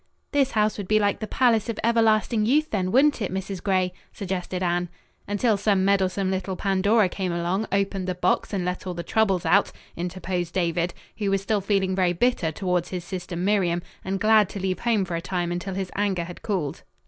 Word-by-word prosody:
"This 275 -2 +2
house 215 -1 +1
would 200 - -5
be 215 - +3
like 205 -1 +1
the 215 - -4
palace 235 -3 +2
of 230 - -3
everlasting 225 -1 +3
youth, 295 +8 +2
then, 185 -3 0
wouldn't 280 +2 +4
it, 195 - -2
Mrs. 190 0 -4
Gray?" 185 -2 +1 0.2
suggested 185 -2 -4
Anne. 175 0 0 0.4
"Until 205 +2 +1
some 195 -2 +2
meddlesome 195 -1 +1
little 190 0 -2
Pandora 200 +2 +2
came 185 0 -3
along, 175 +5 -1
opened 195 -1 0
the 185 - -1
box 180 0 0
and 190 -4 -1
let 180 +1 -3
all 180 - -3
the 170 - -4
troubles 195 -4 +1
out," - - +3 0.2
interposed 175 0 -3
David, 175 -1 0 0.2
who 205 -2 0
was 195 0 0
still 205 0 0
feeling 195 -1 +1
very 180 -2 +2
bitter 180 -4 +1
toward 180 +1 -1
his 180 -2 -5
sister 180 -1 -6
Miriam, 175 -2 +1 0.2
and 190 +1 -2
glad 215 -1 +4
to 200 - -6
leave 185 -1 -1
home 225 -5 +1
for 180 -2 -4
a 165 - -2
time 175 -1 -2
until 175 +2 -3
his 190 -1 -3
anger 195 -4 0
had 175 +1 -9
cooled. 185 -10 -2
190 Hz, 205 wpm, -25 LUFS, 180-210 Hz, 0.4 s, wouldn't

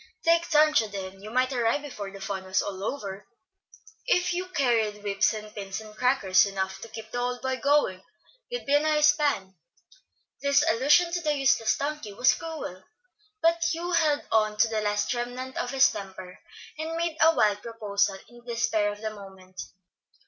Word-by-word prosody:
"Take 335 0 +4
Sancho, 305 -7 +4
then; 195 -1 -7
you 210 - -8
might 255 +3 +1
arrive 245 +4 +1
before 210 -9 -7
the 195 0 -11
fun 195 -1 -4
was 190 0 0
all 195 -1 -6
over, 200 -5 -5 0.8
if 360 -7 +2
you 365 +1 -3
carried 230 - 0
whips 205 +1 +2
and 215 -1 -7
pins 195 -1 -5
and 215 -1 -12
crackers 215 -6 +3
enough 190 -1 -4
to - - -8
keep 220 0 -10
the 245 - -3
old 245 +1 -3
boy 260 0 -1
going; 275 -10 +1 0.5
you'd - - -5
be 280 - 0
a 290 - +6
nice 300 0 +4
span." 240 -13 0 0.9
This 280 0 +3
allusion 295 +9 +4
to 345 0 -1
the 300 -2 0
useless 265 -5 +2
donkey 285 -7 -4
was 245 +5 +4
cruel, 310 - -7 0.6
but 335 0 +3
Hugh 345 +2 -3
held 310 -4 +2
on 215 -1 +2
to 215 - +4
the 220 -1 -2
last 210 +2 0
remnant 250 +2 -5
of 245 - -2
his 270 0 +4
temper, 190 -2 -9 0.4
and 325 +1 -3
made 335 -1 -2
a 325 +1 +6
wild 205 -1 +2
proposal 205 -4 -1
in 240 - -17
the 240 0 -7
despair 215 -3 +1
of 205 0 -10
the 220 -1 -4
moment. 190 -3 -11
230 Hz, 185 wpm, -27 LUFS, 205-290 Hz, 0.9 s, a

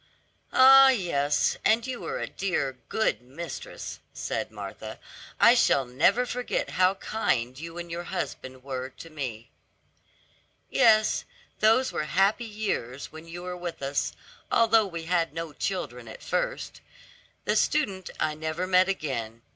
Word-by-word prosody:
"Ah, 270 +1 +9
yes, 160 - +1
and 225 +1 +3
you 255 -2 -5
were - - -3
a - - -2
dear, 140 -9 -2
good 220 - +1
mistress," 170 - -7 0.2
said - - -3
Martha, - - -8 0.4
"I 235 - +8
shall 140 - +3
never 170 - +3
forget 250 +1 -2
how 185 +1 +3
kind 130 - -1
you 165 +2 -8
and 170 -1 -6
your 170 +1 -4
husband 130 -8 -5
were 130 -1 -4
to 165 +5 -12
me." 125 -7 -6 1.2
"Yes, 215 -1 +4 0.4
those 225 +5 +4
were 155 - -2
happy 195 +8 +2
years 200 - -3
when 160 +1 -11
you 175 +1 -8
were 180 0 -4
with 175 -4 -6
us, 140 +1 -1 0.4
although 225 -2 +4
we 170 -3 -6
had 165 -2 0
no 165 -2 -4
children 125 - -4
at 110 - -10
first. - - -2 0.6
The - - +1
student 200 - +1
I 155 - +1
never 160 +3 -3
met 185 0 +4
again. 115 - -3
175 Hz, 145 wpm, -27 LUFS, 140-215 Hz, 1.2 s, Ah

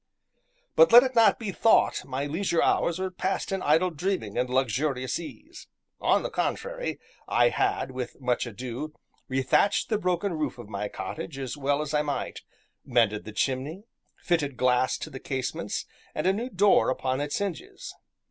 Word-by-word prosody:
But - - +7
let 240 - +10
it 260 -1 -2
not 230 -2 +5
be 215 -4 -4
thought 225 +4 +3
my 135 +2 -3
leisure 170 +3 0
hours 170 - +2
were 185 0 -2
passed 190 +2 -2
in 195 -1 -1
idle 160 +5 +3
dreaming 160 - -2
and 125 +1 0
luxurious 130 +1 0
ease; 300 - -10 0.3
on - - +2
the - - -3
contrary, - - -2 0.3
I - - +4
had, 395 -2 0
with 130 -1 -6
much 125 -1 0
ado, 125 +6 -6 0.3
rethatched 135 +9 +2
the 215 -2 +1
broken 180 0 0
roof 155 -4 -2
of 105 - -10
my 105 0 -3
cottage 140 +10 -6
as 135 -1 -4
well 145 +1 0
as 155 0 -6
I 150 - +3
might, 145 -1 -3 0.4
mended 115 -4 +1
the 110 - -7
chimney, 135 - -2 0.3
fitted 145 -6 -1
glass 125 0 +2
to - - -7
the 130 - -7
casements 130 -1 -3 0.3
and - - -2
a 190 - +4
new 235 +5 -3
door 200 -2 +4
upon 130 +1 -1
its 145 0 -2
hinges. 200 -5 -5
150 Hz, 170 wpm, -27 LUFS, 130-190 Hz, 0.4 s, let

